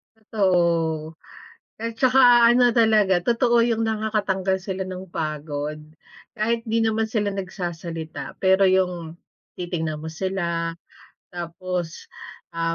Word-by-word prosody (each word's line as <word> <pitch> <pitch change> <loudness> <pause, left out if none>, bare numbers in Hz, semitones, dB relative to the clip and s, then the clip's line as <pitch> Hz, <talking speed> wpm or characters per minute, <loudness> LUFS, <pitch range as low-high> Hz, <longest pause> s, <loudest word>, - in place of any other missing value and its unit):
Totoo. 170 -7 0 0.7
At 230 0 -4
saka 250 -2 +6
ano 245 0 +5
talaga, 215 -6 +4
totoo 235 +3 +2
yung 225 -1 0
nakakatanggal 210 -4 0
sila 190 0 -4
ng 185 0 -7
pagod. 150 -1 -4 0.6
Kahit 230 +2 0
di 225 0 0
naman 220 0 +1
sila 215 -3 0
nagsasalita, 175 -4 -6
pero 190 +1 +4
yung 180 -3 0 0.4
titingnan 160 -4 -3
mo 160 - -6
sila, 170 -1 -2 0.6
tapos, 175 -1 -5 0.5
ah, 165 0 -1
190 Hz, 110 wpm, -23 LUFS, 165-220 Hz, 0.7 s, saka